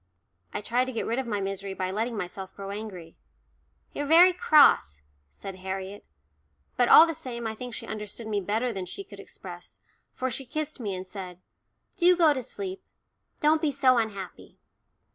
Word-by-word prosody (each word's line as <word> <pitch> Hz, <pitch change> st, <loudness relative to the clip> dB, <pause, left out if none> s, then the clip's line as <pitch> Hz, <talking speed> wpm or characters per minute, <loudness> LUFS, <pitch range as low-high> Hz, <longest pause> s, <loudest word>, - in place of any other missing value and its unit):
I -, -, -4 dB
tried 245 Hz, +4 st, +1 dB
to 260 Hz, -, -5 dB
get 230 Hz, -, -3 dB
rid 235 Hz, +3 st, -1 dB
of 265 Hz, -, -3 dB
my 210 Hz, -3 st, -1 dB
misery 195 Hz, 0 st, -4 dB
by 185 Hz, 0 st, -2 dB
letting 225 Hz, +3 st, -2 dB
myself 190 Hz, 0 st, -6 dB
grow 195 Hz, 0 st, -7 dB
angry. 200 Hz, -6 st, -8 dB, 0.8 s
"You're 290 Hz, -, -3 dB
very 345 Hz, +4 st, +7 dB
cross," 285 Hz, -, +4 dB, 0.3 s
said 185 Hz, -, -9 dB
Harriet; 190 Hz, +1 st, -6 dB, 0.7 s
but 245 Hz, -1 st, +2 dB
all 325 Hz, -, +10 dB
the 330 Hz, -, -3 dB
same 255 Hz, -7 st, -6 dB
I 220 Hz, -, -2 dB
think 245 Hz, +1 st, -7 dB
she -, -, -7 dB
understood 210 Hz, +1 st, -6 dB
me 210 Hz, -2 st, -1 dB
better 225 Hz, +6 st, -1 dB
than 190 Hz, -2 st, -5 dB
she 395 Hz, -, -7 dB
could -, -, -13 dB
express, -, -, -11 dB, 0.4 s
for 260 Hz, 0 st, -2 dB
she 270 Hz, -, -5 dB
kissed 310 Hz, 0 st, -4 dB
me 205 Hz, -5 st, -3 dB
and 185 Hz, 0 st, -6 dB
said, 185 Hz, -2 st, -8 dB, 0.6 s
"Do 360 Hz, -1 st, +5 dB
go 320 Hz, -4 st, +5 dB
to 260 Hz, -, -3 dB
sleep 380 Hz, -, -7 dB, 0.6 s
don't 305 Hz, +1 st, +4 dB
be 305 Hz, -, +1 dB
so 255 Hz, -2 st, +4 dB
unhappy." 200 Hz, -5 st, -5 dB
225 Hz, 180 wpm, -27 LUFS, 195-280 Hz, 0.8 s, all